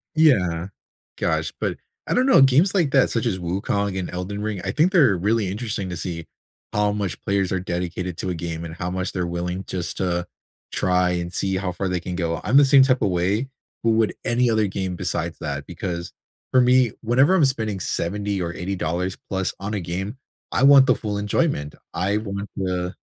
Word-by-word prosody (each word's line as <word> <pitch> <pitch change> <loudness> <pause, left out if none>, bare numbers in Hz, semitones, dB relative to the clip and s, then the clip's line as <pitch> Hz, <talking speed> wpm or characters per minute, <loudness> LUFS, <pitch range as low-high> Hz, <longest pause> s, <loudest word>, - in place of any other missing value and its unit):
Yeah. 90 - +3 0.5
Gosh, - - -1
but - - -2 0.3
I - - 0
don't 250 - +3
know, 265 - +6
games 135 +8 +5
like 170 -8 +2
that 135 -2 +4
such 115 - -1
as, 95 -6 0
Wukong 95 +3 -1
and 90 - -4
Elden 90 +3 -4
Ring, 105 -3 -3
I - - -1
think 160 +5 +3
they're 140 - +5
really 105 +2 +1
interesting 105 -2 -3
to 90 - -4
see 85 -1 -5 0.5
how 105 0 +2
much 100 -3 -3
players 100 -1 0
are 95 - 0
dedicated 90 0 -3
to 95 - -2
a 90 - -2
game, 85 0 -4
and 80 - -7
how 90 +1 -3
much 90 0 -2
they're 90 -2 -2
willing 90 +2 -3
just 90 -2 -4
to 90 -1 -1 0.5
try 90 -1 +2
and 85 0 -3
see 95 -1 0
how 95 -1 -2
far 95 +2 -3
they 90 -1 0
can 90 +1 -5
go. 85 -2 -2
I'm 115 +8 +3
the 145 - +8
same 135 0 +7
type 130 -1 +2
of 105 - +2
way, 95 +9 0 0.3
but 115 - +3
with 110 -1 +2
any 120 0 +2
other 110 -2 +2
game 95 -1 -3
besides 85 -2 -3
that. 70 -1 -4
Because 85 -2 -5 0.4
for 130 - +5
me, 125 -1 +4
whenever 130 +9 +4
I'm 165 - +4
spending 110 -7 -1
$70 100 +3 -2
or 85 -1 -3
$80 90 0 -2
plus 95 -1 -1
on 100 +2 -4
a 105 - -1
game, 95 +7 -4 0.3
I - - 0
want 140 -1 +8
the 125 - +5
full 105 -1 -3
enjoyment. 105 - 0 0.2
I 100 +3 0
want 100 -1 -4
the 90 -1 -2
95 Hz, 205 wpm, -23 LUFS, 90-115 Hz, 0.5 s, the